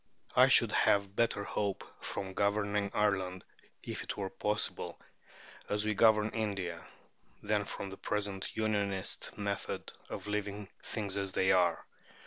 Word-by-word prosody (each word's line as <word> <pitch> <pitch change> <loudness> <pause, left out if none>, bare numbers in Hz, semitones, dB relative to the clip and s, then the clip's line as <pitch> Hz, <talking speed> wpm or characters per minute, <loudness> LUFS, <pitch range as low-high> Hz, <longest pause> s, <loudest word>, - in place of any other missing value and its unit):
I - - +8
should - - +5
have 100 -1 +3
better 115 -3 +2
hope 100 -1 -1 0.2
from 95 -1 -3
governing 100 0 +1
Ireland 95 -3 +1 0.4
(if - - -4
it - - -5
were 95 -2 -3
possible) 105 +2 -1 0.7
as 105 +1 +1
we 110 - +2
govern 110 0 +5
India, 100 -6 -2 0.6
than 105 -1 +1
from 100 0 -5
the 95 - -8
present 100 -2 -3
Unionist 100 -3 -1
method 100 -1 -3 0.2
of - - -5
leaving 105 -1 -3
"things 100 -3 -3
as 100 -1 -2
they 95 - +3
are." 90 -2 +3
100 Hz, 135 wpm, -33 LUFS, 95-105 Hz, 0.7 s, I